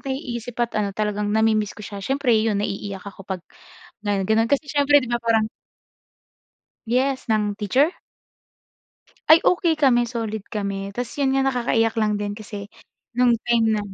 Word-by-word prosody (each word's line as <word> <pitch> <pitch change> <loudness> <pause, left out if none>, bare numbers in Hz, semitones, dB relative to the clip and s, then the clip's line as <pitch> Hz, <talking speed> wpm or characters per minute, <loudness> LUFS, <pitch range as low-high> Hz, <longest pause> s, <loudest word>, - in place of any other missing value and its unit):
naiisip 245 -4 -5
at 235 - -10
ano 210 -1 0
talagang 210 -1 -1
nami-miss 215 -2 +1
ko 210 - -9
siya. 200 0 -7
Siyempre 270 +3 +1
yun, 220 -1 +2
naiiyak 200 -1 -4
ako 200 -1 -10
pag 190 -2 -3 0.7
ano, 200 -1 +1
ganun. 225 +3 +2
Kasi 285 +2 +1
siyempre 290 -1 +4
'di 240 - -6
ba 240 - 0
parang 225 -2 +2 1.4
Yes, 260 +3 0
ng 210 -1 +1
teacher? 255 - +2 1.4
Ay, 320 +1 +7
okey 345 -2 +3
kami. 245 -5 +3
Solid 225 -3 -3
kami. 200 -2 -3
Tapos 235 +4 -5
'yun 270 -1 +2
nga 270 - +2
nakakaiyak 235 -3 +1
lang 210 -1 +1
din 205 0 -3
kasi 205 -1 -8 0.5
no'ng 245 -1 +3
time 235 -2 +3
na - - -1
225 Hz, 160 wpm, -23 LUFS, 210-255 Hz, 1.4 s, Ay